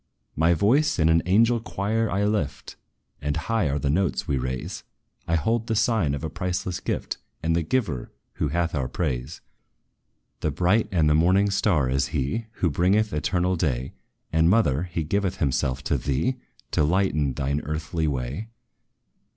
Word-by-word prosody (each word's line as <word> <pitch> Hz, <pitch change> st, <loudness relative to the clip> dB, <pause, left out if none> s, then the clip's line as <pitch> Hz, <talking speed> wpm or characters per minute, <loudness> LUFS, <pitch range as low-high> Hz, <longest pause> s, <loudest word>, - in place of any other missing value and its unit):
"My 80 Hz, +3 st, +3 dB
voice 130 Hz, -, +3 dB
in 80 Hz, -3 st, +3 dB
an 80 Hz, 0 st, +4 dB
angel 115 Hz, +5 st, +4 dB
choir 110 Hz, +1 st, -1 dB
I 100 Hz, +3 st, 0 dB
lift; 80 Hz, -11 st, -2 dB, 0.5 s
And 75 Hz, 0 st, -1 dB
high 110 Hz, -9 st, 0 dB
are 70 Hz, -, 0 dB
the 70 Hz, -1 st, 0 dB
notes 95 Hz, +3 st, 0 dB
we 70 Hz, -, +1 dB
raise: 65 Hz, 0 st, -4 dB, 0.4 s
I 85 Hz, -, +2 dB
hold 115 Hz, +7 st, 0 dB
the 110 Hz, -, 0 dB
sign 105 Hz, -, +2 dB
of 70 Hz, -, -7 dB
a -, -, -1 dB
priceless 90 Hz, 0 st, -2 dB
gift, -, -, -3 dB, 0.3 s
And 80 Hz, +1 st, +1 dB
the 85 Hz, -, +2 dB
Giver, 80 Hz, -, -1 dB, 0.3 s
who 75 Hz, -, 0 dB
hath 85 Hz, +3 st, -1 dB
our 70 Hz, -5 st, -1 dB
praise. 65 Hz, 0 st, -3 dB, 1.0 s
"'The 80 Hz, -, 0 dB
bright 90 Hz, +9 st, +2 dB
and 85 Hz, -5 st, +3 dB
the 75 Hz, -, +4 dB
morning 95 Hz, +6 st, +3 dB
star' 85 Hz, -9 st, +2 dB
is 65 Hz, +1 st, +1 dB
he, 75 Hz, -, -2 dB
Who 85 Hz, -7 st, 0 dB
bringeth 100 Hz, +7 st, +2 dB
eternal 90 Hz, +4 st, +1 dB
day! 65 Hz, -6 st, -1 dB, 0.4 s
And, 80 Hz, +1 st, +4 dB
mother, 90 Hz, -, +3 dB
he 85 Hz, -1 st, -1 dB
giveth 95 Hz, +3 st, -1 dB
himself 65 Hz, -3 st, 0 dB
to -, -, 0 dB
thee, 75 Hz, -, 0 dB, 0.3 s
To -, -, +2 dB
lighten 75 Hz, -4 st, +1 dB
thine 70 Hz, +1 st, -1 dB
earthly 75 Hz, +1 st, -2 dB
way. 70 Hz, -, -3 dB
85 Hz, 165 wpm, -25 LUFS, 70-100 Hz, 1.0 s, an